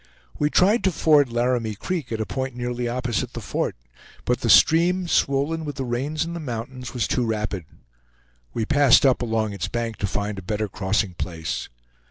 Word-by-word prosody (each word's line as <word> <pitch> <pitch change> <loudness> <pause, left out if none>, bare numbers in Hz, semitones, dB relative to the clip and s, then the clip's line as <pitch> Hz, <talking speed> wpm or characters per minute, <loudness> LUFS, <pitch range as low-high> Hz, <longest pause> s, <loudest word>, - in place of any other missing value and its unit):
We 150 - +2
tried 205 +9 +3
to 190 - +4
ford 150 -5 +4
Laramie 120 -2 0
Creek 155 - -4
at 110 - -2
a 110 - -1
point 130 +6 -4
nearly 120 0 -3
opposite 120 -2 -2
the - - -5
fort, - - -2 0.5
but 125 - 0
the 115 - -1
stream, 170 - +5
swollen 145 +2 +1
with 145 -2 -5
the 135 -2 -3
rains 140 +6 -1
in 170 - -5
the 170 - -4
mountains, 125 -2 -6
was 120 - 0
too 125 - 0
rapid. 105 -6 -2 0.9
We 115 - -2
passed 145 0 +5
up 130 -2 +4
along 110 -3 -1
its 95 -2 -3
bank 115 +1 -3
to 100 - -1
find 100 +1 -3
a - - -8
better 105 +3 -2
crossing 95 0 -1
place. 85 -2 -4
120 Hz, 190 wpm, -23 LUFS, 110-145 Hz, 0.9 s, stream